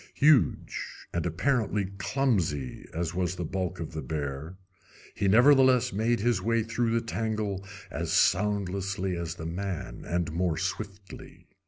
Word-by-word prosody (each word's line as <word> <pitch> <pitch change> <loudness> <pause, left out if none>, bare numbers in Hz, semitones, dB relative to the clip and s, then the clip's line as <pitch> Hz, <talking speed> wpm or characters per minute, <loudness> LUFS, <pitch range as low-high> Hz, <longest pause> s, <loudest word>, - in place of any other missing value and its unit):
Huge 150 -4 +3 0.3
and 85 0 0
apparently 105 - +1
clumsy 90 - -1
as 85 0 -2
was 90 0 -1
the 90 - -3
bulk 90 0 -3
of 80 -1 -5
the 80 - -3
bear, 75 +3 -4 0.6
he 100 - 0
nevertheless 130 +3 +5
made 115 +2 +1
his 115 -4 +2
way 115 +2 +1
through 115 +1 0
the 115 0 0
tangle 110 -3 -2 0.3
as - - -3
soundlessly 95 -1 +1
as 85 -1 -4
the 80 - -7
man, 90 +1 -4
and 85 -2 -1
more 85 -1 0
swiftly. 95 +3 -6
95 Hz, 140 wpm, -28 LUFS, 85-115 Hz, 0.6 s, nevertheless